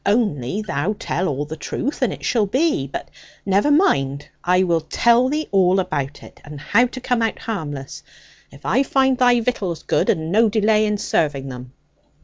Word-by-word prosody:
Only 200 - 0
thou 205 +1 -2
tell 180 +4 -2
all 145 0 -2
the 155 +2 -7
truth, 275 - -4
and 250 -6 +2
it - - -7
shall 220 -4 +1
be 260 - +1
but 140 - -6 0.4
never 200 +8 +2
mind, 140 - +2 0.2
I 180 +1 +3
will 170 -3 +1
tell 235 +8 +3
thee 305 +2 -2
all 190 -1 +3
about 145 -7 -3
it, - - -15
and 150 -1 -10
how 230 - +3
to 255 - -8
come 245 -2 0
out 225 -1 0
harmless, 145 -11 -6 0.5
if 140 - -16
I 260 - +2
find 265 -1 +2
thy 245 -1 +4
victuals 200 -8 -2
good, - - 0
and 160 +1 0
no 220 +3 +4
delay 215 0 +2
in 210 0 0
serving 145 -8 -1
them.' 125 0 -9
200 Hz, 185 wpm, -21 LUFS, 150-240 Hz, 0.5 s, thy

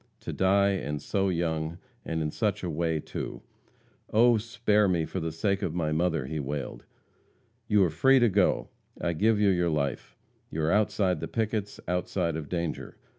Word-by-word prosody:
To - - -5
die, 100 +1 +3
and 75 -6 -2
so 95 +6 0
young, 80 -2 -1 0.3
and 80 -1 -2
in 75 - -2
such 105 0 -1
a 90 - -2
way, 80 0 0
too! - - -6 0.7
"Oh, 120 +1 +5
spare 105 -2 +2
me 85 -3 +1
for 95 - -4
the 80 -1 -3
sake 100 +5 0
of 85 - -2
my 80 -3 0
mother!" 80 -2 0
he 75 +3 -4
wailed. 70 0 -5 0.8
"You 105 -3 +4
are 85 - +1
free 135 - +5
to 120 -2 +5
go! 100 -1 +2 0.3
I 85 - -1
give 105 +5 +2
you 105 -1 +4
your 90 -2 +2
life. 70 -4 -2 0.3
You 80 - -3
are 80 - +2
outside 105 -3 +2
of - - -8
the - - -4
pickets, 110 -2 -2
outside 90 -1 -1
of 80 -2 -5
danger. 85 -3 -3
90 Hz, 185 wpm, -28 LUFS, 80-105 Hz, 0.8 s, Oh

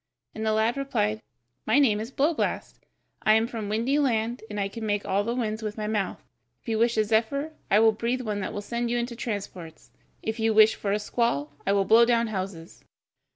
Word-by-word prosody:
And 220 - -5
the 220 - +1
lad 220 +3 +1
replied: 220 -6 -1 0.5
"My 220 +4 +4
name 235 -8 +4
is 225 +4 -5
Blowblast, 295 +4 -1 0.4
I 215 - +4
am 220 +1 +3
from 225 -3 -5
Windy 235 +7 +1
Land, 235 -3 0
and 210 -1 -4
I 200 - 0
can 225 +3 -8
make 205 -1 -1
all 195 +2 +1
the 235 +3 -2
winds 220 -3 -2
with 215 0 -5
my 215 - -3
mouth. 210 -3 -2 0.4
If - - -8
you 220 -1 0
wish 235 0 +2
a 215 - +4
zephyr, 230 +8 0 0.2
I 205 - +5
will 225 0 +6
breathe 235 +4 -2
one 210 -4 -3
that 190 - -3
will 205 - -5
send 235 +2 -2
you 240 - 0
into 240 0 -3
transports. 200 -8 -6 0.3
If 220 +1 -3
you 220 -1 +1
wish 215 0 +7
for 200 - -3
a 205 - +2
squall, 210 - -1 0.2
I 200 - +3
will 200 -1 +2
blow 225 +4 +6
down 235 0 +3
houses." 185 -5 -6
220 Hz, 220 wpm, -26 LUFS, 210-235 Hz, 0.5 s, wish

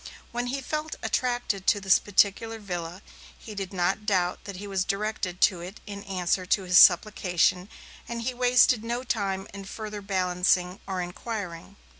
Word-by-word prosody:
When 240 +1 -2
he 270 +2 -2
felt 305 +3 -3
attracted 245 -6 -1
to 205 - +4
this 190 -1 +4
particular 205 +3 +1
villa, 180 -3 -6 0.3
he 220 - -10
did 195 -2 -5
not 190 +3 -1
doubt 180 -4 0
that 200 - -7
he 200 +3 -7
was 195 -2 -1
directed 195 -3 -3
to 180 -3 +4
it 185 +5 -9
in 200 -1 -7
answer 185 -1 -1
to 190 +2 +1
his 180 0 +6
supplication, 180 -1 +4 0.4
and 235 0 -4
he 255 +2 -2
wasted 245 -2 +4
no 240 +2 -3
time 195 -5 -2
in 200 0 -7
further 210 +1 -6
balancing 180 -1 +1
or 185 -2 -2
inquiring. 185 -1 -6
200 Hz, 165 wpm, -27 LUFS, 180-220 Hz, 0.4 s, his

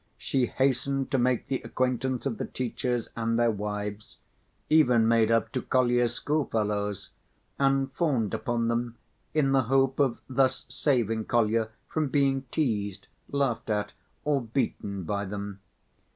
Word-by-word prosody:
She 130 -2 0
hastened 135 0 0
to 135 - +2
make 125 0 +1
the 135 -1 -2
acquaintance 130 0 -1
of 120 -6 -2
the - - -1
teachers 125 -1 -2
and 115 0 0
their 120 -1 +3
wives, 105 0 -5 0.5
even 125 -8 +5
made 115 -1 +4
up 115 -1 +2
to - - -2
Kolya's 120 -2 +2
schoolfellows, 105 -9 -1 0.5
and 135 -1 +2
fawned 135 - 0
upon 120 -1 -1
them 115 0 -1 0.4
in 140 -3 +3
the 135 -1 +4
hope 135 +2 +2
of 135 -4 +2
thus 130 0 +1
saving 115 -6 +1
Kolya 115 -1 +2 0.2
from 155 -2 -1
being 135 -1 +1
teased, 105 - -1 0.2
laughed 135 -6 -1
at, 105 -1 -1 0.3
or 145 -2 +2
beaten 110 -5 -2
by 100 +4 -2
them. 100 0 -5
120 Hz, 140 wpm, -28 LUFS, 110-135 Hz, 0.5 s, even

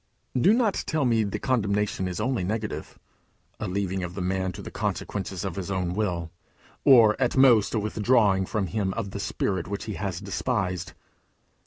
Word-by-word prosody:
Do 130 +11 +5
not 225 -3 +2
tell 155 -3 +1
me 115 -3 +3
the 100 - -2
condemnation 105 -6 0
is 90 +1 -4
only 120 -2 0
negative 110 +3 -4 0.6
a - - -3
leaving 95 0 -2
of 90 0 -5
the 95 - -3
man 95 0 -1
to - - -8
the - - -8
consequences 95 -1 -3
of 95 -2 -4
his 95 -1 -4
own 90 -2 -1
will, 90 -5 -2 0.5
or 115 -6 +7
at 125 0 +1
most 120 -5 +5
a - - +2
withdrawing 105 -2 +2
from 105 -3 -1
him 95 +2 -2
of 105 -4 -3
the 100 - -5
Spirit 95 -3 -2
which 100 +1 -4
he 110 - -5
has 95 -4 -3
despised. 95 -3 -2
100 Hz, 180 wpm, -26 LUFS, 95-110 Hz, 0.6 s, or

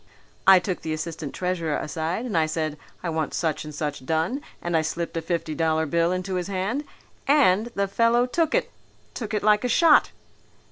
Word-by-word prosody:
I 190 0 +10
took 180 0 -2
the 160 - -3
assistant 155 -2 -5
treasurer 175 -4 -1
aside 165 +8 -3
and 230 - -4
I 160 -1 +3
said, 155 -1 -2 0.3
'I 175 - -1
want 160 -2 -2
such 160 -3 -1
and 150 -1 -8
such 145 -3 -3
done,' 160 - -1 0.2
and 175 -1 -2
I 160 - +4
slipped 165 +2 -3
a 165 - -1
fifty 165 -1 -2
dollar 160 0 +1
bill 170 +3 +1
into 185 +1 -2
his 180 0 -3
hand. 200 +9 -2 0.4
And 235 -8 +4
the 200 0 +1
fellow 230 +4 +3
took 320 +5 0
it, - - 0 0.4
took 220 -3 -5
it 210 - -1
like 210 +1 +4
a 250 - 0
shot." 315 +5 +5
175 Hz, 195 wpm, -25 LUFS, 160-210 Hz, 0.4 s, I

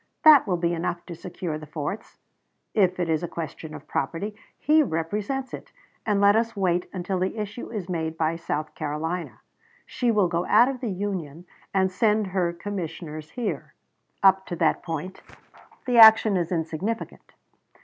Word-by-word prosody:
That 305 -7 +8
will 180 -3 +1
be 170 0 0
enough 170 +1 -3
to 175 - -7
secure 170 -2 -5
the 155 - -10
forts. 155 +7 -5 0.6
If 185 -4 +2
it 175 - 0
is 160 -2 +1
a 175 - -3
question 160 -1 -7
of - - -11
property, 170 +9 -2 0.2
he 310 +2 +4
represents 210 - -2
it, - - -8 0.4
and 205 -2 +2
let 200 +1 +5
us 230 +1 0
wait 180 -3 0
until 185 0 -3
the 190 +4 -2
issue 210 +2 -5
is 210 -6 -5
made 160 -3 -3
by 160 0 +1
South 155 -2 -4
Carolina. 160 +4 -4 0.4
She 245 - -1
will 210 -5 +3
go 170 0 -1
out 235 +4 +6
of 265 -2 -4
the 235 - -3
Union 180 -5 -4 0.3
and 190 -1 +2
send 210 +3 +2
her 185 -2 0
commissioners 165 -4 -6
here. 245 -3 -4 0.5
Up 190 0 +5
to 175 - -4
that 165 -2 +1
point 170 +2 -5 0.6
the 245 -2 +3
action 220 -2 +8
is 175 -2 -1
insignificant. 170 +7 -4
180 Hz, 170 wpm, -25 LUFS, 165-210 Hz, 0.6 s, That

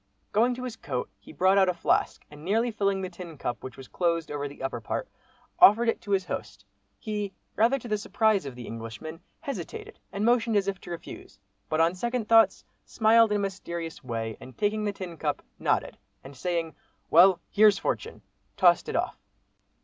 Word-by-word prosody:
Going 240 +4 +3
to 255 - -7
his 250 -3 -5
coat, 125 - -4
he 100 - -14
brought 185 +6 +3
out 190 -1 +4
a 180 - 0
flask, 170 - 0
and 150 0 -12
nearly 225 +7 +1
filling 200 -2 0
the 185 - -4
tin 170 -3 -9
cup 120 -3 -4
which 130 -2 -8
was 135 - -10
closed 170 -3 -1
over 145 -1 -3
the 140 -1 -10
upper 130 -3 -3
part, - - -3 0.5
offered 230 +4 +7
it - - -1
to - - -12
his 195 -2 +2
host. 100 - -6 0.3
He, 210 - -4 0.2
rather 235 +5 +3
to 245 - -9
the 210 -2 0
surprise 215 - +1
of 130 - -7
the 125 -1 -8
Englishman, 115 +8 -7 0.2
hesitated 270 - -6
and 200 +2 -2
motioned 235 -2 +3
as 200 -1 +2
if 195 -2 -3
to - - -11
refuse, 170 - -9 0.3
but 155 - 0
on 165 +2 +4
second 235 +3 -2
thoughts 225 0 +5 0.2
smiled 225 0 +4
in - - +2
a - - -1
mysterious 170 -4 -5
way, 115 -3 -4
and 130 - -12
taking 210 0 0
the 205 - 0
tin 185 -4 -8
cup, 145 -2 -2 0.2
nodded, - - 0 0.2
and 135 +1 -11
saying 165 +1 -2 0.4
"Well, 180 +3 +7
here's 210 -1 +6
fortune!" - - -3 0.3
tossed - - +4
it - - -3
off. - - -2
185 Hz, 195 wpm, -27 LUFS, 155-215 Hz, 0.5 s, offered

